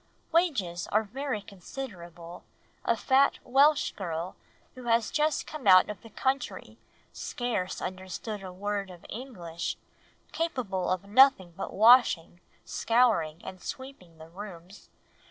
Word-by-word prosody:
"Wages 260 - +1
are 215 +1 +2
very 250 0 -4
considerable... 175 -5 -9 0.4
a - - +1
fat 270 +1 +3
Welsh 280 +4 +4
girl 170 -1 -4 0.4
who 255 -1 -11
has 230 -1 +2
just 300 -1 +1
come 305 -8 -7
out 185 +2 +7
of 205 - -10
the 225 - -13
country, 265 +4 -3 0.3
scarce 230 -7 -3
understood 185 +3 -5
a 190 -1 -7
word 200 +1 -3
of 175 -2 -13
English, 180 -10 -5 0.5
capable 250 - -2
of 185 0 0
nothing 205 -4 +5
but 195 - -5
washing, 215 -7 +5 0.3
scouring, 210 -10 +2
and 185 - -8
sweeping 260 -11 -8
the 160 0 -12
rooms 185 0 -11
205 Hz, 125 wpm, -29 LUFS, 180-255 Hz, 0.5 s, out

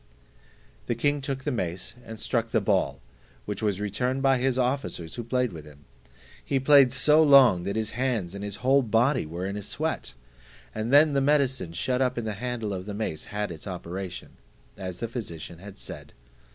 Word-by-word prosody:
The 120 - 0
king 145 +4 +1
took 135 -1 -4
the 145 - -1
mace, 95 -2 -3
and 110 -2 -9
struck 115 -1 -1
the 115 - +2
ball, 95 -9 +1 0.5
which 105 +1 -4
was 105 -3 0
returned 125 +6 -1
by 135 -2 +4
his 130 0 +1
officers 125 - -1
who 120 - -5
played 125 -2 0
with 80 -2 -8
him; 75 -1 -16 0.6
he 135 - 0
played 135 -1 +6
so 150 +4 +5
long, 135 - +6
that 100 - -2
his 110 -1 -1
hands 120 -8 -1
and 100 0 -6
his 100 -1 -5
whole 135 +1 +5
body 120 - +2
were 85 +4 -5
in 100 +1 -3
a 105 - -4
sweat, 95 - -3 0.6
and 110 +3 -3
then 145 +1 +6
the 140 - +2
medicine 135 - +1
shut 125 +9 -1
up 125 -1 +1
in 120 - -2
the 110 - -2
handle 115 -1 -3
of 95 -1 -5
the 105 - -4
mace 105 -8 -3
had 105 -2 -3
its 80 +4 -8
operation, 90 0 -6 0.4
as 95 -1 -6
the 115 - -1
physician 85 -8 -7
had 100 +1 -11
said. - - -8
115 Hz, 195 wpm, -27 LUFS, 95-130 Hz, 0.6 s, played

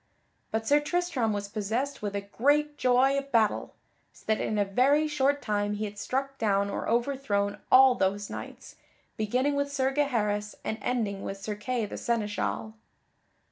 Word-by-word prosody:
But 220 0 -2
Sir 290 +1 +5
Tristram 300 -7 0
was 205 -1 -3
possessed 225 +7 -2
with 205 -1 -3
a 200 - -1
great 290 +9 +1
joy 260 +1 +3
of 275 0 -10
battle, 220 -3 +1 0.4
so - - -20
that 220 0 +1
in 215 - -1
a 205 - +2
very 275 +10 +3
short 285 -1 +1
time 205 -1 0
he 215 +1 -2
had 205 0 -7
struck 270 +4 -3
down 200 -2 +1
or - - -3
overthrown 235 -4 0
all 260 0 +8
those 200 -2 0
knights, - - -9 0.4
beginning 250 +7 0
with 280 0 -1
Sir 270 -1 0
Gaheris, 210 -8 0
and 220 - -3
ending 215 -6 -1
with 195 - -5
Sir 210 +2 -4
Kay 225 +2 -2
the - - -7
seneschal. 195 - -2
230 Hz, 170 wpm, -28 LUFS, 205-275 Hz, 0.4 s, all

